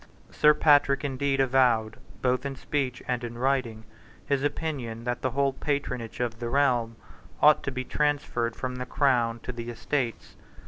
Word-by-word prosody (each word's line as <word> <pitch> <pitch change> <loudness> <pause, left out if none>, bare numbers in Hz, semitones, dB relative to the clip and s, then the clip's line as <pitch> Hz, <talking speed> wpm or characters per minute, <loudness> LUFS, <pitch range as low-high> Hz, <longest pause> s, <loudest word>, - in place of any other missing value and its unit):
Sir 150 0 +5
Patrick 145 -2 +4
indeed 135 0 -1
avowed, 125 -4 +2 0.3
both 125 -1 +1
in 140 -1 -4
speech 135 -3 -3
and 125 -1 -1
in 120 0 -6
writing, 125 -4 0 0.4
his 140 -1 0
opinion 140 -6 -3
that 120 0 -2
the 130 - 0
whole 135 +2 +1
patronage 130 -5 -3
of 115 -2 -2
the 120 -1 -3
realm 120 -4 +1 0.4
ought 150 0 +6
to 140 - -3
be 130 0 -4
transferred 140 -5 -1
from 125 -1 -4
the 125 0 -5
Crown 120 -5 +1
to - - -5
the 120 -1 -7
Estates. 120 +1 -3
130 Hz, 165 wpm, -27 LUFS, 120-140 Hz, 0.4 s, ought